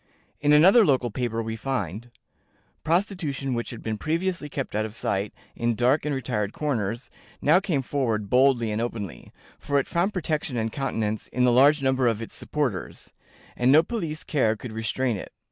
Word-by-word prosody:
In 145 Hz, +1 st, +2 dB
another 185 Hz, +10 st, +7 dB
local 130 Hz, -, +2 dB
paper 115 Hz, 0 st, -2 dB
we 110 Hz, 0 st, -4 dB
find: 115 Hz, -3 st, -4 dB, 0.7 s
"Prostitution, 165 Hz, -, -1 dB
which 120 Hz, 0 st, -2 dB
had 120 Hz, -, -8 dB, 0.2 s
previously 165 Hz, -1 st, -1 dB
kept 135 Hz, -5 st, -4 dB
out 110 Hz, -, +1 dB
of 110 Hz, 0 st, -6 dB
sight 100 Hz, -1 st, -2 dB, 0.2 s
in 120 Hz, 0 st, 0 dB
dark 125 Hz, +7 st, +2 dB
and 145 Hz, -, 0 dB
retired 105 Hz, -5 st, -2 dB
corners, 120 Hz, -5 st, -2 dB, 0.3 s
now 160 Hz, +5 st, +5 dB
came 170 Hz, -9 st, -1 dB
forward 115 Hz, -7 st, -1 dB
boldly 125 Hz, -1 st, +3 dB
and 105 Hz, +2 st, -1 dB
openly; 105 Hz, -, -5 dB, 0.3 s
for 145 Hz, -, 0 dB
it 140 Hz, -, +1 dB
found 180 Hz, +3 st, 0 dB
protection 155 Hz, -8 st, -2 dB
and 110 Hz, -1 st, -1 dB
countenance 110 Hz, -6 st, -2 dB
in 125 Hz, -, -1 dB
the 125 Hz, -, +5 dB
large 140 Hz, +4 st, +5 dB
number 130 Hz, -1 st, +2 dB
of 115 Hz, -2 st, +1 dB
its 115 Hz, -, -7 dB
supporters, 135 Hz, -11 st, -4 dB, 0.4 s
and 125 Hz, +1 st, +3 dB
no 155 Hz, +3 st, +7 dB
police 165 Hz, -7 st, -4 dB
care 115 Hz, -7 st, +1 dB
could 115 Hz, +2 st, -8 dB
restrain 115 Hz, +1 st, -1 dB
it. -, -, -8 dB
130 Hz, 175 wpm, -25 LUFS, 115-150 Hz, 0.7 s, another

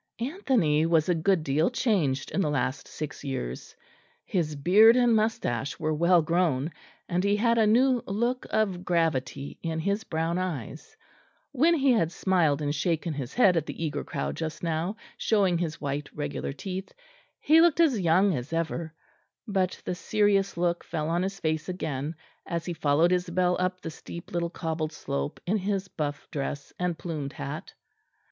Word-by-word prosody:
Anthony 235 Hz, -, +1 dB
was 165 Hz, 0 st, +3 dB
a -, -, +5 dB
good 170 Hz, +1 st, +2 dB
deal 150 Hz, +5 st, +2 dB
changed 180 Hz, -, 0 dB
in 195 Hz, -, 0 dB
the 155 Hz, -, +1 dB
last 135 Hz, 0 st, -1 dB
six 155 Hz, -1 st, -6 dB
years; 100 Hz, -, -5 dB, 0.5 s
his 160 Hz, -5 st, -1 dB
beard 200 Hz, +11 st, +6 dB
and 245 Hz, -2 st, +4 dB
moustache 145 Hz, -, -1 dB
were 155 Hz, -1 st, 0 dB
well 170 Hz, +2 st, +4 dB
grown; 160 Hz, -3 st, +1 dB, 0.4 s
and 180 Hz, +1 st, 0 dB
he 200 Hz, +1 st, +3 dB
had 230 Hz, +2 st, +2 dB
a 220 Hz, -, +4 dB
new 250 Hz, +3 st, +4 dB
look 235 Hz, +6 st, -1 dB
of 195 Hz, -5 st, 0 dB
gravity 145 Hz, -6 st, -1 dB
in 165 Hz, -1 st, -2 dB
his 200 Hz, +6 st, -1 dB
brown 165 Hz, -1 st, -1 dB
eyes; 165 Hz, -, -5 dB, 0.5 s
when 310 Hz, +5 st, +4 dB
he 275 Hz, -3 st, +3 dB
had 190 Hz, -9 st, +2 dB
smiled 165 Hz, -7 st, +1 dB
and 145 Hz, 0 st, 0 dB
shaken 160 Hz, +2 st, -1 dB
his 135 Hz, -4 st, -6 dB
head 195 Hz, -7 st, +5 dB
at 160 Hz, -2 st, 0 dB
the 165 Hz, -, -4 dB
eager 145 Hz, -2 st, -3 dB
crowd -, -, -3 dB
just 160 Hz, 0 st, -5 dB
now, 165 Hz, +4 st, -1 dB, 0.2 s
showing 195 Hz, -6 st, +2 dB
his 165 Hz, -3 st, -3 dB
white 140 Hz, 0 st, -3 dB
regular 145 Hz, -2 st, -3 dB
teeth, 185 Hz, +6 st, -6 dB, 0.5 s
he 320 Hz, +2 st, +5 dB
looked 340 Hz, -1 st, +4 dB
as 295 Hz, -10 st, +4 dB
young 185 Hz, +3 st, +4 dB
as 125 Hz, 0 st, -4 dB
ever; 165 Hz, -1 st, -2 dB, 0.5 s
but 190 Hz, -3 st, 0 dB
the -, -, -1 dB
serious 200 Hz, 0 st, +1 dB
look 175 Hz, 0 st, 0 dB
fell 155 Hz, -2 st, -3 dB
on 170 Hz, +1 st, +1 dB
his 195 Hz, +1 st, -3 dB
face 155 Hz, 0 st, -1 dB
again, 155 Hz, -4 st, -3 dB, 0.3 s
as 170 Hz, -1 st, -3 dB
he 175 Hz, -, -3 dB
followed 160 Hz, +2 st, +3 dB
Isabel 180 Hz, 0 st, +1 dB
up 185 Hz, 0 st, -1 dB
the 165 Hz, -, -5 dB
steep 170 Hz, +2 st, -10 dB
little 170 Hz, -1 st, -1 dB
cobbled 160 Hz, -2 st, -3 dB
slope 70 Hz, -, -4 dB
in 200 Hz, +5 st, +1 dB
his 195 Hz, -1 st, -2 dB
buff 145 Hz, -2 st, -4 dB
dress 140 Hz, 0 st, -4 dB
and 180 Hz, -2 st, -1 dB
plumed 155 Hz, -5 st, -5 dB
hat. 150 Hz, +4 st, -6 dB
170 Hz, 170 wpm, -27 LUFS, 155-195 Hz, 0.5 s, beard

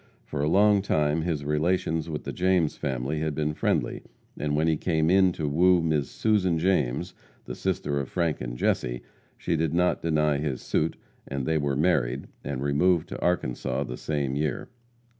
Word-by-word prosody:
For 70 Hz, -, -4 dB
a 75 Hz, -, +1 dB
long 100 Hz, +2 st, +5 dB
time 75 Hz, -4 st, +1 dB
his 80 Hz, -4 st, -2 dB
relations 80 Hz, +1 st, 0 dB
with 75 Hz, -2 st, -4 dB
the -, -, -5 dB
James 90 Hz, -4 st, +2 dB
family 65 Hz, +3 st, -2 dB
had 80 Hz, -1 st, -2 dB
been 75 Hz, 0 st, -1 dB
friendly, -, -, -1 dB, 0.3 s
and 75 Hz, 0 st, -2 dB
when 80 Hz, +2 st, +2 dB
he 80 Hz, -, +3 dB
came 80 Hz, 0 st, +1 dB, 0.2 s
to 80 Hz, -3 st, -3 dB
woo 90 Hz, +5 st, +4 dB
Miss 75 Hz, -4 st, 0 dB
Susan 95 Hz, -6 st, +1 dB
James, 85 Hz, -1 st, 0 dB, 0.3 s
the -, -, -6 dB
sister 70 Hz, 0 st, -1 dB
of 70 Hz, -, -4 dB
Frank 85 Hz, -4 st, -1 dB
and -, -, -5 dB
Jesse, -, -, -1 dB, 0.3 s
she 85 Hz, -, -1 dB
did 80 Hz, 0 st, 0 dB
not 90 Hz, +1 st, +2 dB
deny 75 Hz, -2 st, +1 dB
his 70 Hz, -5 st, -3 dB
suit, 80 Hz, -, 0 dB, 0.3 s
and 70 Hz, -2 st, -3 dB
they 80 Hz, +1 st, +1 dB
were 70 Hz, -2 st, 0 dB
married, 70 Hz, -5 st, +1 dB, 0.2 s
and 70 Hz, -1 st, -3 dB
removed 80 Hz, +4 st, +2 dB
to -, -, -6 dB
Arkansas 65 Hz, -6 st, -1 dB
the 60 Hz, -2 st, -6 dB
same 70 Hz, -2 st, -2 dB
year. 75 Hz, -2 st, -2 dB
75 Hz, 180 wpm, -26 LUFS, 70-85 Hz, 0.3 s, long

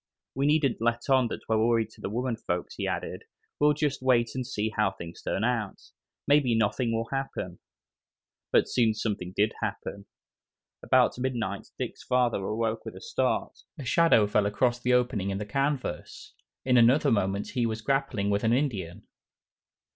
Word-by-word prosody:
"We 135 Hz, +2 st, 0 dB
needn't 145 Hz, -6 st, +2 dB
let 120 Hz, +3 st, 0 dB
on 130 Hz, -3 st, +4 dB, 0.2 s
we're 110 Hz, 0 st, +2 dB
worried 115 Hz, -1 st, +2 dB
to -, -, -17 dB
the -, -, -3 dB
women 120 Hz, +3 st, -1 dB
folks," 90 Hz, -5 st, -4 dB
he -, -, -3 dB
added, -, -, -4 dB, 0.3 s
"we'll 150 Hz, 0 st, +5 dB
just 145 Hz, -2 st, -1 dB
wait 120 Hz, -3 st, +3 dB
and 130 Hz, -2 st, -4 dB
see 110 Hz, -4 st, -2 dB
how 105 Hz, -2 st, +3 dB
things 85 Hz, -3 st, -10 dB
turn 100 Hz, -, -2 dB
out. 115 Hz, -4 st, -1 dB, 0.5 s
Maybe 140 Hz, -5 st, +4 dB
nothing 115 Hz, +2 st, +1 dB
will 115 Hz, 0 st, -2 dB
happen." 135 Hz, -10 st, -4 dB, 0.9 s
But -, -, +4 dB
something 105 Hz, -5 st, 0 dB
did 105 Hz, +2 st, +2 dB
happen. 100 Hz, 0 st, -5 dB, 0.7 s
About -, -, +3 dB
midnight 120 Hz, -6 st, -2 dB
Dick's -, -, -5 dB
father 125 Hz, -5 st, +1 dB
awoke 110 Hz, +2 st, -2 dB
with -, -, -8 dB
a -, -, -9 dB
start. 465 Hz, -, -1 dB, 0.2 s
A 140 Hz, -, -7 dB
shadow 165 Hz, -5 st, +4 dB
fell 105 Hz, 0 st, +2 dB
across 120 Hz, +4 st, +1 dB
the 125 Hz, +1 st, +1 dB
opening 120 Hz, -6 st, +1 dB
in 95 Hz, -, -2 dB
the 105 Hz, -, -4 dB
canvas. 135 Hz, +5 st, -3 dB, 0.3 s
In 125 Hz, -1 st, +4 dB
another 130 Hz, +5 st, +5 dB
moment 100 Hz, -2 st, 0 dB
he 120 Hz, -3 st, 0 dB
was 110 Hz, 0 st, -3 dB
grappling 135 Hz, -7 st, 0 dB
with 100 Hz, 0 st, 0 dB
an 115 Hz, +1 st, +3 dB
Indian. 105 Hz, -, -2 dB
115 Hz, 165 wpm, -28 LUFS, 105-130 Hz, 0.9 s, we'll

